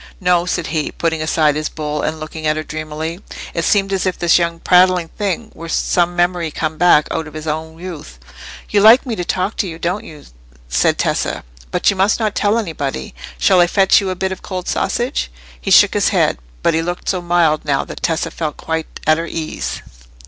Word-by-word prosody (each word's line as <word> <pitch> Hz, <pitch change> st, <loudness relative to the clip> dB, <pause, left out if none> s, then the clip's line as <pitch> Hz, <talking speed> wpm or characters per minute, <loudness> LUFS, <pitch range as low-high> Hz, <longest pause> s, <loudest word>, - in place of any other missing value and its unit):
"No," 180 Hz, -2 st, +2 dB
said 175 Hz, -1 st, -1 dB
he, 155 Hz, -2 st, -1 dB
putting 165 Hz, -1 st, -1 dB
aside 155 Hz, -1 st, +2 dB
his 155 Hz, 0 st, -2 dB
bowl, 150 Hz, -1 st, -3 dB
and 155 Hz, +1 st, -2 dB
looking 155 Hz, 0 st, -5 dB
at 155 Hz, -, +2 dB
her 155 Hz, -, -2 dB
dreamily. 155 Hz, +3 st, -5 dB, 0.3 s
It 170 Hz, -, -1 dB
seemed 195 Hz, +1 st, +2 dB
as 190 Hz, -1 st, 0 dB
if 185 Hz, -, -1 dB
this 175 Hz, 0 st, +4 dB
young 170 Hz, -1 st, -1 dB
prattling 180 Hz, -1 st, +4 dB
thing 210 Hz, +3 st, -3 dB
were 165 Hz, 0 st, -9 dB
some 175 Hz, +1 st, +1 dB
memory 175 Hz, -1 st, +1 dB
come 155 Hz, +1 st, -3 dB
back 170 Hz, -3 st, +5 dB
out 160 Hz, -1 st, -2 dB
of 155 Hz, -, -12 dB
his 155 Hz, 0 st, -6 dB
own 160 Hz, +1 st, -4 dB
youth. 165 Hz, -, -8 dB, 0.5 s
"You 205 Hz, -, +2 dB
like 225 Hz, +6 st, +7 dB
me 240 Hz, -4 st, -3 dB
to 180 Hz, -, -3 dB
talk 185 Hz, +4 st, -2 dB
to 200 Hz, -, 0 dB
you, 165 Hz, -2 st, -7 dB
don't 170 Hz, +2 st, -2 dB
you?" 150 Hz, -2 st, -12 dB, 0.4 s
said -, -, +2 dB
Tessa, -, -, -1 dB, 0.3 s
"but 65 Hz, -, +2 dB
you -, -, -4 dB
must 195 Hz, +5 st, +2 dB
not 215 Hz, -2 st, 0 dB
tell 205 Hz, +2 st, +1 dB
anybody. 145 Hz, -, -4 dB, 0.2 s
Shall 180 Hz, -, +4 dB
I 175 Hz, -, +5 dB
fetch 195 Hz, +2 st, +4 dB
you 195 Hz, -, -2 dB
a 185 Hz, -, -2 dB
bit 190 Hz, +1 st, -2 dB
of 190 Hz, -, -6 dB
cold 185 Hz, -2 st, -5 dB
sausage?" 60 Hz, 0 st, -1 dB, 0.3 s
He -, -, -3 dB
shook -, -, +6 dB
his -, -, +2 dB
head, -, -, +1 dB, 0.2 s
but 170 Hz, -, +3 dB
he 160 Hz, -, +1 dB
looked 175 Hz, +2 st, -4 dB
so 185 Hz, -2 st, 0 dB
mild 170 Hz, -3 st, +2 dB
now 140 Hz, -2 st, 0 dB
that -, -, -9 dB
Tessa 165 Hz, -2 st, -1 dB
felt 155 Hz, -3 st, -4 dB
quite 160 Hz, 0 st, -4 dB
at 155 Hz, +1 st, +4 dB
her 165 Hz, -, -3 dB
ease. 160 Hz, -2 st, -4 dB
170 Hz, 215 wpm, -18 LUFS, 155-185 Hz, 0.5 s, like